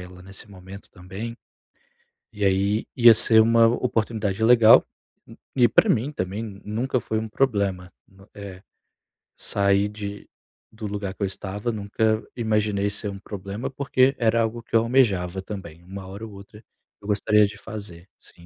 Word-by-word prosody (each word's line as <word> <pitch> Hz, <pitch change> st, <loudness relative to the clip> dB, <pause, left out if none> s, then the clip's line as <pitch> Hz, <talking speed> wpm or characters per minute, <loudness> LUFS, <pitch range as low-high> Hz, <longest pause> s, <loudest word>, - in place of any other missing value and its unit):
ela 90 Hz, 0 st, -12 dB
nesse 95 Hz, +3 st, -11 dB
momento 95 Hz, +1 st, -13 dB
também. 95 Hz, +6 st, -8 dB, 1.0 s
E 105 Hz, -, -5 dB
aí 100 Hz, +3 st, +1 dB
ia 120 Hz, -2 st, +8 dB
ser 110 Hz, 0 st, +6 dB
uma 115 Hz, +1 st, +5 dB
oportunidade 110 Hz, -3 st, -1 dB
legal, 115 Hz, -1 st, +7 dB, 0.7 s
e 120 Hz, -2 st, +5 dB
para -, -, +3 dB
mim 125 Hz, +7 st, +1 dB
também 100 Hz, -2 st, -4 dB, 0.2 s
nunca 120 Hz, +4 st, -1 dB
foi 110 Hz, -, -2 dB
um 110 Hz, -, -5 dB
problema, 100 Hz, -8 st, -1 dB, 0.2 s
no, 95 Hz, +1 st, -21 dB
eh, 95 Hz, -2 st, -10 dB, 0.8 s
sai 100 Hz, 0 st, +1 dB
de 105 Hz, -1 st, -8 dB, 0.4 s
do 110 Hz, -1 st, -7 dB
lugar 100 Hz, -1 st, -4 dB
que 105 Hz, -, -20 dB
eu 100 Hz, -, +1 dB
estava, 100 Hz, +4 st, -5 dB
nunca 110 Hz, +1 st, -1 dB
imaginei 105 Hz, -3 st, 0 dB
ser 105 Hz, +1 st, -5 dB
um 100 Hz, -, -8 dB
problema, 100 Hz, +3 st, -6 dB
porque 135 Hz, 0 st, +1 dB
era 115 Hz, -1 st, +2 dB
algo 115 Hz, +1 st, -3 dB
que 115 Hz, -, -6 dB
eu 115 Hz, -, +7 dB
almejava 100 Hz, -7 st, +1 dB
também, 95 Hz, -4 st, -9 dB
uma 95 Hz, +1 st, -9 dB
hora 100 Hz, +4 st, -8 dB
ou 110 Hz, -, -11 dB
outra 100 Hz, +3 st, -14 dB, 0.4 s
eu 100 Hz, -, -12 dB
gostaria 105 Hz, 0 st, +3 dB
de 100 Hz, -, -7 dB
fazer, 100 Hz, -5 st, -7 dB
sim. 85 Hz, -, -16 dB
105 Hz, 160 wpm, -23 LUFS, 95-115 Hz, 1.0 s, ia